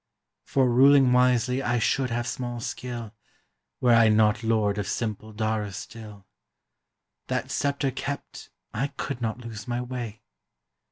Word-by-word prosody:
"For 135 -2 +2
ruling 130 +1 +6
wisely 125 +1 +3
I 120 -2 +1
should 130 +3 +1
have 120 0 -2
small 120 -1 -4
skill. 120 -2 -5 0.7
Were 125 -2 +4
I 115 -1 +6
not 105 0 +3
lord 110 -3 +1
of 100 - -3
simple 110 -1 -3
Dara 110 -1 -1
still; 105 -1 -9 1.0
That - - -2
scepter 140 -1 0
kept, 140 +3 -6 0.2
I 130 +6 0
could 135 -3 -4
not 115 +1 -2
lose 110 -3 -7
my 120 0 -1
way." 125 -3 -6
120 Hz, 135 wpm, -26 LUFS, 110-125 Hz, 1.0 s, ruling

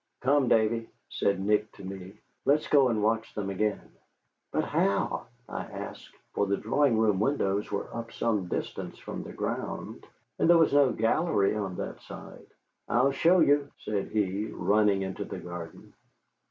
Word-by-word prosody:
"Come, 135 +1 +3
Davy," 115 0 +2 0.2
said 100 -1 +1
Nick 105 +2 +1
to 100 - -13
me, 95 0 -7 0.3
"let's 145 +2 +2
go 140 -3 +5
and 110 -3 0
watch 110 +1 0
them 100 -2 -2
again." 105 +2 -2 0.6
"But - - +1
how?" 100 0 0 0.2
I - - -4
asked, - - -8 0.2
for 100 - +1
the 100 0 +1
drawing 125 +1 +2
room 105 -3 +3
windows 105 -5 0
were 100 - -2
up 115 0 -5
some 105 -6 0
distance - - -4
from - - -6
the - - -8
ground, - - -4 0.3
and - - +3
there 175 - +8
was 165 -3 +4
no 140 -2 +5
gallery 115 - +2
on 100 -4 -3
that - - -5
side. - - -11 0.4
"I'll 130 +3 +3
show 170 +6 +4
you," 145 0 +4
said 105 -2 -3
he, 105 0 -1
running 100 +1 +2
into 95 0 -4
the - - -7
garden. 85 -2 -9
110 Hz, 165 wpm, -28 LUFS, 100-130 Hz, 0.6 s, there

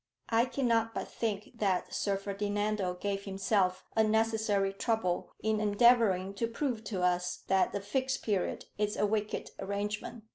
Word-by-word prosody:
"I 230 +1 +4
cannot 230 -4 +1
but - - -3
think 220 +1 -4
that 190 -3 0
Sir 200 -1 0
Ferdinando 205 -1 -1
gave 200 +2 -3
himself 195 -1 +1
unnecessary 220 -2 +2
trouble 200 -4 -1
in 220 0 +1
endeavouring 205 -3 +4
to 230 - 0
prove 230 -1 -2
to 190 -5 -2
us 180 0 0
that 190 0 +3
the 200 - -3
Fixed 260 +6 -1
Period 200 -5 -1
is 210 0 0
a - - +3
wicked 210 0 -2
arrangement. 205 +3 -3
210 Hz, 145 wpm, -31 LUFS, 195-225 Hz, -, I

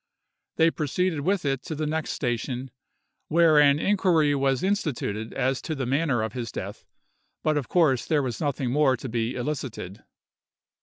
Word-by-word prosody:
They 165 0 +4
proceeded 160 +2 -1
with 185 +3 0
it 135 -2 0
to 160 - -4
the 155 +1 -2
next 155 +1 -2
station, 125 0 -3 0.6
where 160 -1 +5
an 145 -1 +5
inquiry 170 -5 +2
was 135 0 +1
instituted 135 - -1
as 130 0 -1
to 160 - -4
the 135 -2 -3
manner 135 -2 +1
of 110 -1 -4
his 120 -3 -4
death, - - -7 0.6
but 155 -1 +2
of 145 -4 -2
course 155 -8 +2
there 150 -3 +2
was 120 -4 -4
nothing 140 -4 -1
more 135 -2 +3
to 130 - -7
be 115 +1 -2
elicited. 125 -8 -5
140 Hz, 165 wpm, -26 LUFS, 125-155 Hz, 0.6 s, where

